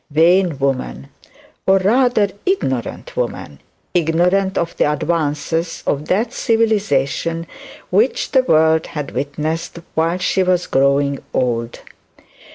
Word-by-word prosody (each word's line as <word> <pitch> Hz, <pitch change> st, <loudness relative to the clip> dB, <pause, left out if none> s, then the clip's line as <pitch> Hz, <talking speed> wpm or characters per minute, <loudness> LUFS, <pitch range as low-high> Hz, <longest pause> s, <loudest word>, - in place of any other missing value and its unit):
Vain 170 Hz, +1 st, +3 dB
woman 125 Hz, -, -2 dB, 0.6 s
or 190 Hz, 0 st, +5 dB
rather 220 Hz, +1 st, +3 dB
ignorant 395 Hz, +5 st, -2 dB
woman -, -, -4 dB, 0.3 s
ignorant 180 Hz, +3 st, +2 dB
of 170 Hz, 0 st, -2 dB
the 150 Hz, -, +2 dB
advances 160 Hz, +1 st, -2 dB
of 145 Hz, +1 st, -1 dB
that 215 Hz, +6 st, 0 dB
civilization 195 Hz, -8 st, 0 dB, 0.5 s
which 215 Hz, +8 st, +1 dB
the 260 Hz, -, +5 dB
world 160 Hz, -8 st, +3 dB
had 150 Hz, -3 st, -5 dB
witnessed 155 Hz, +6 st, -3 dB, 0.2 s
while 165 Hz, +2 st, +1 dB
she 185 Hz, +1 st, 0 dB
was 180 Hz, -1 st, +1 dB
growing 140 Hz, +1 st, +2 dB, 0.2 s
old. 115 Hz, -2 st, -1 dB
165 Hz, 110 wpm, -18 LUFS, 145-195 Hz, 0.6 s, or